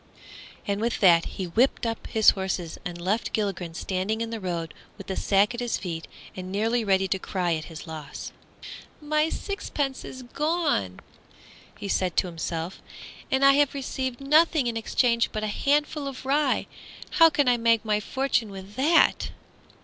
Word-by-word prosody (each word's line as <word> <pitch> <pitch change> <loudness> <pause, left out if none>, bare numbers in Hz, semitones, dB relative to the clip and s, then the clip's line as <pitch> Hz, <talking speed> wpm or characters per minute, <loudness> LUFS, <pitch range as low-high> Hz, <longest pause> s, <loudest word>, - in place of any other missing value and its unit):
and 200 +1 -1
with 235 +1 -1
that 170 -4 +6
he 190 - -5
whipped 235 +9 +1
up 225 -1 -3
his 220 -1 +5
horses 190 -4 -4
and 175 -1 -6
left 195 +6 -1
Gilligren 190 -6 -2
standing 190 +5 -2
in 230 0 -3
the 225 - -4
road 170 -4 -4 0.2
with - - -9
the 190 - -4
sack 200 +3 +2
at 240 - -5
his 240 -1 -1
feet 165 -3 -5 0.3
and 185 0 -6
nearly 225 +4 +1
ready 195 -2 +2
to 190 +1 -1
cry 180 -2 -1
at 155 -1 -3
his 160 -2 -9
loss. 155 -3 -7 0.7
"My 305 +1 +1
sixpence 290 -9 -3
is 260 0 -8
gone," 295 - -1 0.8
he 200 - -6
said 185 -3 0
to - - +4
himself, 165 0 -4 0.5
"and 265 +1 +3
I 275 - +9
have 285 0 +2
received 260 -2 -3
nothing 305 0 +4
in 235 -1 -1
exchange 235 +1 +1
but 215 -1 -3
a 210 -1 -2
handful 295 0 +1
of 265 -1 -7
rye! 285 +2 +2 0.5
How 330 0 +9
can 290 -3 +1
I 245 -1 +4
make 230 -1 +2
my 210 -1 +2
fortune 260 -1 0
with 195 0 -10
that?" 310 +6 +4
220 Hz, 170 wpm, -26 LUFS, 185-270 Hz, 0.8 s, I